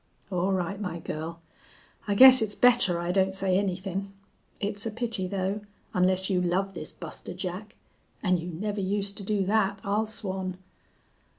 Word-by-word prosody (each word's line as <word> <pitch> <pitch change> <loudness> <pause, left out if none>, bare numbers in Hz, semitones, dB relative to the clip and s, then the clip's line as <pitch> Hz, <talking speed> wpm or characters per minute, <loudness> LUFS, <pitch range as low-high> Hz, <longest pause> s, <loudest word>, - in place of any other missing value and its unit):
"All 180 +1 0
right, 190 +2 -2
my 180 -4 -3
girl. 165 +1 -6 0.7
I 205 - +1
guess 260 +2 +9
it's 210 -2 -1
better 245 -8 +5
I 175 +1 -1
don't 190 0 +2
say 190 -1 +2
anythin'. 195 0 -3 0.5
It's 205 +1 -2
a - - -1
pity, 225 -4 -2
though, 195 +2 -2 0.3
onless 185 +1 +2
you 185 -2 +1
love 190 +2 0
this 155 -3 -7
Buster 170 +1 -7
Jack. 185 +3 -6 0.5
An' 185 -3 +2
you 165 - -6
never 200 +4 -3
used 200 +1 -1
to 200 - -6
do 200 -1 0
that, 200 -1 +1
I'll 210 +2 0
swan." 190 -4 -2
195 Hz, 165 wpm, -27 LUFS, 180-205 Hz, 0.7 s, guess